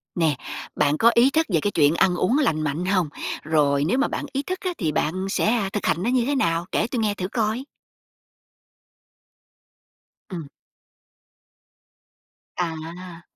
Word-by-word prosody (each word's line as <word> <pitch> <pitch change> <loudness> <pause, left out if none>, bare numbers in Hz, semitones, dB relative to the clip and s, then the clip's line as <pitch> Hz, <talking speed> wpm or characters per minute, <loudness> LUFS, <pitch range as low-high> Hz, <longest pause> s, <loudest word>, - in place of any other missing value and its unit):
Nè, 160 -4 +2 0.4
bạn 145 +1 +2
có 230 +6 +5
ý 240 +3 +5
thức 320 +3 +2
về 165 - +4
cái 205 - -1
chuyện 150 -3 +3
ăn 180 +1 +3
uống 185 +9 +2
lành 165 - +1
mạnh 155 +3 -2
hông? 185 -4 +1 0.3
Rồi 145 -2 +2
nếu 225 - +1
mà 275 - +2
bạn - - -4
ý 275 +1 -1
thức 370 +4 -4
á, 370 - -2
thì 165 -8 -1
bạn 185 +6 -1
sẽ, - - 0
à, 215 -3 +1
thực 205 - -2
hành 175 - +1
nó 230 - +1
như 250 -2 +2
thế 285 +2 0
nào? 170 -7 +1
Kể - - +1
tui 245 0 -3
nghe 215 -2 +1
thử 185 -2 -4
coi. 220 +3 -1 2.7
Ừm. 170 -6 -6 2.1
À. 170 +1 -5
185 Hz, 165 wpm, -23 LUFS, 160-235 Hz, 2.7 s, có